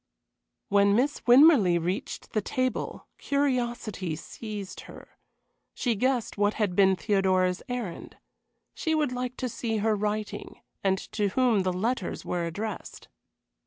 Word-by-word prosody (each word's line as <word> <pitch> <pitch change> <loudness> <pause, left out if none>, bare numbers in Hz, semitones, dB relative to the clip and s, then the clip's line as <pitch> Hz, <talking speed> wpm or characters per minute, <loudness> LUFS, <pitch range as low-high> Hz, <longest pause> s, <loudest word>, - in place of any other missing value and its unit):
When 200 0 +4
Miss 275 +6 +1
Winmarleigh 245 - +7
reached 180 +4 -4
the 215 - +1
table 255 +5 -2
curiosity 240 - -1
seized 205 +3 -7
her. - - -12 0.7
She 245 - 0
guessed 245 -1 0
what 205 +1 +2
had 205 -5 0
been 190 -1 +5
Theodora's 185 0 +1
errand. 235 -9 -5 0.6
She 320 -1 -1
would 300 -4 +1
like 250 0 -4
to 255 - -2
see 225 -1 -2
her 215 +1 +2
writing 210 +1 -3 0.2
and 190 -1 +2
to 210 -2 0
whom 235 +1 +2
the 185 -1 +1
letters 200 +2 -2
were 175 -1 -1
addressed. 210 +6 -6
210 Hz, 130 wpm, -27 LUFS, 190-250 Hz, 0.7 s, Winmarleigh